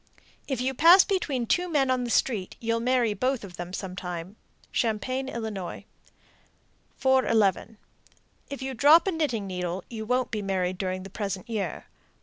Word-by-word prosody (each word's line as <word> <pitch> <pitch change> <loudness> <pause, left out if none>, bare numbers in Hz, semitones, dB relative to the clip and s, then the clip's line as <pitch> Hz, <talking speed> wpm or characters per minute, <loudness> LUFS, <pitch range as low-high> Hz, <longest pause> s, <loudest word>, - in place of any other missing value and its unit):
If 265 -4 -2
you 260 +1 0
pass 335 +8 +8
between 290 - -1
two 355 +9 +1
men 275 -5 +2
on 250 -1 0
the - - -4
street, 215 -5 0
you'll 230 0 0
marry 240 -2 +2
both 255 +4 -1
of 185 -3 -9
them 175 0 -6
sometime. 185 -1 -6 0.4
Champaign, 255 +4 -1
Ill. 220 -7 -5 1.1
411. 225 -6 +2 0.7
If 280 -1 -6
you 265 0 -3
drop 295 +7 +6
a 385 - +1
knitting 290 - -1
needle, 180 -1 -4
you 220 -2 -5
won't 250 +1 0
be 215 - -2
married 185 -2 -1
during 185 -1 -2
the 195 - -10
present 195 0 -4
year. 205 -8 -3
230 Hz, 155 wpm, -27 LUFS, 190-265 Hz, 1.1 s, pass